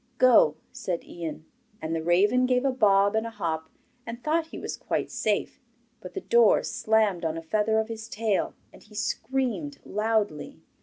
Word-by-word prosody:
'Go,' 240 -12 +6 0.2
said 175 -2 -4
Ian. 160 -2 -7 0.3
And 160 -4 -3
the 165 - -1
raven 205 +9 +3
gave 250 +1 +2
a 270 - +3
bob 200 -4 +3
and 220 +1 0
a - - -4
hop, 165 -7 -3 0.3
and 235 +1 -8
thought 320 +1 +1
he - - -9
was - - -5
quite - - -3
safe, 210 -2 -1 0.4
but 180 -1 -10
the - - -3
door 235 -2 +4
slammed 215 -5 +1
on 165 0 -1
a - - -4
feather 215 +6 +1
of 220 0 +1
his 225 0 -7
tail, 215 -3 -1 0.2
and - - -15
he 210 0 -17
screamed 265 +5 -2
loudly. 210 -7 -1
215 Hz, 175 wpm, -27 LUFS, 175-235 Hz, 0.4 s, Go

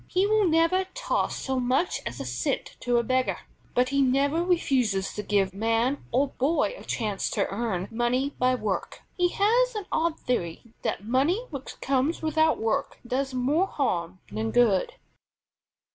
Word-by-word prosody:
He 370 +2 +2
will 425 -1 +3
never 330 +3 +3
toss - - -1
so 265 -1 -2
much 255 +8 +1
as - - -6
a - - -4
cent - - -2
to 245 -1 +1
a 235 - +2
beggar, 255 +2 +1 0.4
but 250 +1 +3
he 280 0 +2
never 280 +5 +2
refuses 255 - +1
to 210 - -4
give 195 -2 +1
man 230 +6 0
or 270 +3 +2
boy 300 - +1
a - - -11
chance 210 -4 -2
to - - 0
earn 200 -3 -2
money 245 +4 0
by 255 0 +3
work. 215 -5 -3
He 355 -1 +3
has 470 +6 +2
an 420 -2 -3
odd 325 0 0
theory 175 -10 -2 0.2
that 200 - -3
money 285 - +1
which 275 -3 -7
comes 275 +5 0
without 315 0 +3
work 220 0 -1
does 265 +2 -2
more 290 +9 +2
harm 185 - -1
than 110 +2 -2
good. 220 - +3
260 Hz, 165 wpm, -26 LUFS, 225-325 Hz, 0.4 s, will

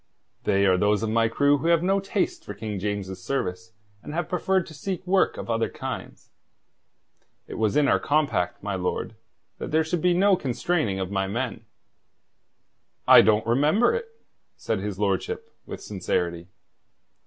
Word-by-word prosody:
"They 100 0 +3
are 95 -1 +4
those 105 +2 +2
of 110 - -1
my 115 0 +3
crew 145 +5 +2
who 165 - -2
have 170 -1 +3
no 195 +2 +2
taste 195 0 -2
for 105 - -8
King 105 -1 -5
James's 95 -2 -4
service, 115 -1 -3 0.3
and 150 - -8
have 175 - -1
preferred 185 0 0
to 160 - -12
seek 185 +4 -5
work 185 +1 +2
of - - -6
other 115 -1 0
kinds. - - -7 1.1
It - - -9
was 110 -2 0
in 145 -1 +4
our - - +3
compact, 145 - 0
my 100 -1 -2
lord, 95 +4 -3 0.4
that - - -5
there 160 +1 +2
should 160 +1 -2
be 180 +1 +3
no 195 +2 +4
constraining 130 - -1
of 95 0 -3
my 95 -1 0
men." 115 +1 -4 1.4
"I - - +10
don't 110 0 +3
remember 145 - +3
it," 470 0 -3 0.5
said 110 -3 -2
his 100 -1 -4
lordship, 100 -2 -2 0.2
with - - -7
sincerity. 85 -3 -2
115 Hz, 165 wpm, -25 LUFS, 100-160 Hz, 1.4 s, I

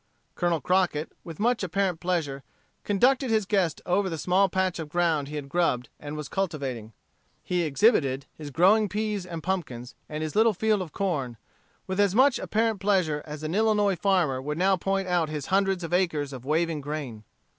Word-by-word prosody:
Colonel 175 -3 0
Crockett, 180 -4 +1
with 165 -2 -9
much 240 +2 +1
apparent 185 -2 -1
pleasure, 165 -7 -2 0.4
conducted 255 +6 +2
his 220 -2 +2
guest 185 -5 0
over 190 +2 +1
the 165 - -4
small 185 +5 +2
patch 185 -1 0
of 160 -2 -5
ground 160 -4 +1
he 150 - -7
had 145 -2 -5
grubbed 140 -6 0
and 145 0 -7
was 150 -2 -5
cultivating. 135 - -3 0.5
He 180 -1 0
exhibited 140 - +2
his 150 -2 -8
growing 195 +8 +4
peas 210 -2 -2
and 165 -3 -6
pumpkins, 140 -10 -3 0.2
and 155 +1 -4
his 155 - -4
little 220 0 +4
field 215 +1 +1
of 170 -4 -6
corn, 145 - -2 0.5
with 190 +1 -3
as 200 -1 +3
much 265 +1 +4
apparent 225 -1 0
pleasure 185 -7 +1
as 150 0 -7
an 155 +2 -3
Illinois 210 -2 +2
farmer 175 -8 +1
would 150 +3 -4
now 190 +2 +3
point 195 +1 -1
out 175 -3 +1
his 150 -3 -4
hundreds 195 -2 +2
of 165 - -5
acres 155 -6 0
of 130 -1 -9
waving 160 +1 0
grain. 140 -7 -5
175 Hz, 185 wpm, -26 LUFS, 150-195 Hz, 0.5 s, growing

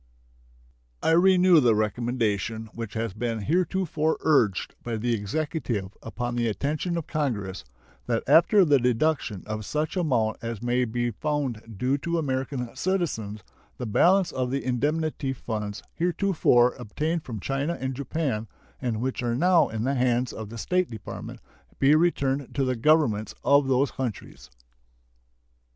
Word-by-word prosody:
I - - +3
renew 180 0 +6
the 120 -5 +4
recommendation 110 0 -1
which 115 -2 -6
has 115 -3 -2
been 115 +1 -3
heretofore 160 - 0
urged 115 - +2
by 115 -2 -3
the 120 +2 0
Executive 115 - -3
upon 120 +2 -4
the 120 -1 +1
attention 150 - -1
of 165 - -3
Congress, 110 - -2 0.4
that 115 -2 0
after 170 +7 +6
the 145 -3 +4
deduction 125 - 0
of 110 0 -4
such 150 - -2
amount 125 -11 +1
as 115 -2 -4
may 125 +1 +1
be 120 +1 -1
found 120 -5 -3
due 130 +6 0
to 170 +4 -1
American 130 -4 -2
citizens 115 - -2 0.3
the 125 - -4
balance 180 - +3
of 130 -1 -2
the 135 +1 -2
indemnity 145 +2 -1
funds 105 -5 -5
heretofore 170 -8 +3
obtained 155 +8 -2
from 115 -4 -6
China 140 - -2
and 130 0 -2
Japan, 130 -4 -2 0.3
and 115 -4 -2
which 130 0 -2
are 120 -1 0
now 175 +4 +4
in 110 0 -3
the 135 +3 +1
hands 125 -1 +1
of 110 -2 -7
the 115 - -8
State 180 - 0
Department, 110 -3 -8 0.4
be 135 +2 +5
returned 140 -5 +1
to 135 - +1
the 130 0 0
Governments 115 -5 +2
of 140 -1 +4
those 135 +1 +2
countries. 110 - -6
125 Hz, 145 wpm, -26 LUFS, 115-155 Hz, 0.4 s, renew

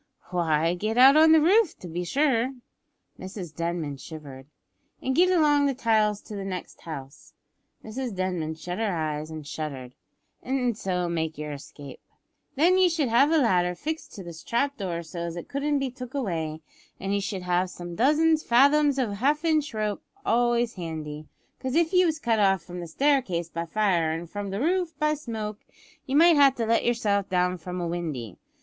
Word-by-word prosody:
"Why, 165 -2 +1
get 215 +6 -2
out 265 +3 +8
on 315 +1 +7
the 320 - +7
roof 380 +4 +3
to 180 - -10
be 175 +2 -4
sure," 265 - +1 0.6
(Mrs 185 -4 -7
Denman 165 -4 -3
shivered) 140 -3 -10 0.5
"and 265 0 -2
get 360 +4 +5
along 295 -5 +4
the 275 - -1
tiles 215 -4 +2
to 210 - -9
the 200 - -4
next 185 -2 -6
house," 140 -4 -9 0.5
(Mrs 235 0 -5
Denman 180 -4 -2
shut 175 +4 -6
her 220 -2 0
eyes 155 -1 -3
and 155 -2 -8
shuddered) 140 -5 -6 0.5
"an' 250 -2 0
so 185 -4 -2
make 160 -2 -2
yer 150 0 -5
escape. 140 -1 -10 0.6
Then 350 +6 +4
you 370 -1 +5
should 315 -6 0
have 245 +6 +4
a 325 - +3
ladder 180 - +2
fixed 315 - -5
to 195 - -8
this 170 -2 -9
trap 280 +4 0
door 175 -6 -4
so 170 +2 -8
as 170 0 -4
it 175 - -7
couldn't 285 +1 -1
be 270 -2 -2
took 255 +1 -9
away, 160 - -3 0.4
and 195 +1 -2
ye 200 - +1
should 195 -2 -4
have 180 +1 +1
some 175 -1 -8
dozen 305 - +3
fathoms 285 +1 +4
o' 250 -6 0
half 285 +10 0
inch 310 -3 +1
rope 215 -2 -2 0.2
always 240 0 +2
handy, 155 -4 -6 0.3
cause 260 +1 -3
if 335 +1 +2
ye 365 0 +5
was 320 -2 0
cut 230 -7 0
off 195 -3 +3
from 180 +1 -8
the 170 - -6
staircase 195 - +1
by 170 0 -4
fire 175 -5 +1
an' 165 +1 -4
from 205 +3 -6
the 195 +1 -3
roof 345 +3 0
by 305 0 +2
smoke 220 -7 -5 0.5
ye 270 - -1
might 335 +1 +6
have 275 -2 +6
to 230 - -1
let 230 +1 +2
yourself 210 -5 0
down 180 -1 +1
from 180 +1 -6
a 175 - -2
windy. 155 - -4
205 Hz, 190 wpm, -26 LUFS, 170-275 Hz, 0.6 s, out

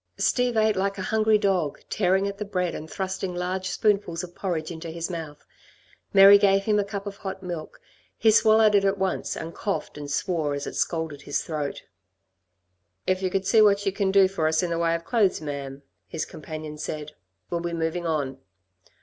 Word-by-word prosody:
Steve 245 -2 +1
ate 215 -1 +3
like 195 +1 -1
a 190 - -4
hungry 220 +1 +3
dog, 190 -8 0
tearing 190 0 +1
at 200 0 -6
the - - -1
bread, 180 -4 -2
and 155 - -7
thrusting 190 -1 -3
large 185 +1 -2
spoonfuls 200 -6 0
of 175 -1 -9
porridge 175 -4 -3
into 165 0 -7
his 170 +2 -4
mouth. 155 -4 -7 0.7
Mary 200 +1 +9
gave 195 -1 +3
him 210 0 +2
a - - +2
cup 200 0 -6
of 200 -1 -6
hot 190 -2 -6
milk. 170 -4 -6 0.4
He 220 - +4
swallowed 220 0 +5
it 200 -1 +4
at 195 0 +2
once, 190 -1 -2
and 165 +1 -6
coughed 200 -7 -4
and 145 -1 -7
swore 150 -1 -1
as 140 - -4
it - - -6
scalded 160 -4 -2
his - - -2
throat. 150 -3 -4 1.2
"If 185 0 +1
you 185 - 0
could 190 +1 -1
see 220 +2 +5
what 205 -1 +4
you 195 - +2
can 195 0 0
do 195 0 +6
for 185 -5 -1
us 160 +3 +1
in 175 - -1
the 170 - -1
way 165 0 +2
of 165 0 -6
clothes, 215 -4 +2
ma'am," 140 -2 -6 0.2
his 160 -2 -3
companion 155 0 -8
said, 150 0 -5 0.4
"we'll 170 - -1
be 170 0 -3
moving 165 +1 -2
on." 140 -4 -2
185 Hz, 200 wpm, -25 LUFS, 160-200 Hz, 1.2 s, Mary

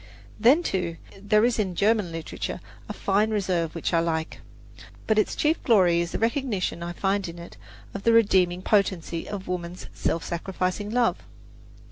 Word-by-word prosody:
Then, 260 +10 +5
too, 175 - -2 0.2
there 210 +2 +3
is 240 -2 +1
in 190 -4 -1
German 210 -2 +2
literature 165 -1 -5 0.3
a - - -2
fine 205 +2 +1
reserve 180 -6 -1
which 165 - -2
I 165 - +4
like; 160 -1 -2 0.6
but 220 -1 +3
its - - 0
chief 310 +2 +1
glory 180 -7 +4
is 170 -1 -3
the - - -2
recognition 225 - -1
I 170 0 -4
find 195 +1 -1
in 170 - -9
it 170 0 -10 0.4
of 200 - -5
the 230 - +3
redeeming 185 -5 +3
potency 190 -5 0
of 200 -2 -6
woman's 180 0 -5
self 165 - -2
sacrificing 185 +3 -3
love. 235 +1 +2
190 Hz, 165 wpm, -25 LUFS, 170-215 Hz, 0.6 s, Then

